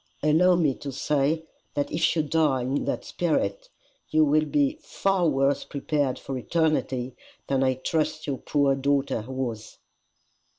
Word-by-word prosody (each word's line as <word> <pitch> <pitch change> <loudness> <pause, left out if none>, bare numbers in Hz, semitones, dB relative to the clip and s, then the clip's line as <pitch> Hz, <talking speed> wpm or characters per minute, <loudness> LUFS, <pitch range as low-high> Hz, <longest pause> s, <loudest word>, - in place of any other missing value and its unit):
"Allow 170 +4 +5
me 155 -6 +2
to 140 - -6
say 145 +3 0 0.3
that 145 - -1
if 160 - +1
you 160 - +2
die 150 -3 +1
in 135 +3 -1
that - - -2
spirit, - - -1 0.4
you 155 0 +4
will 155 +1 +3
be 290 - +1
far 195 -4 +1
worse 135 0 +1
prepared 145 -2 -1
for 135 - -6
eternity 130 -5 0 0.3
than 135 -1 0
I 130 -1 +2
trust 155 +3 -1
your 140 -3 -3
poor 140 -2 +2
daughter 135 -4 0
was." 130 -5 -5
145 Hz, 145 wpm, -26 LUFS, 135-160 Hz, 0.4 s, Allow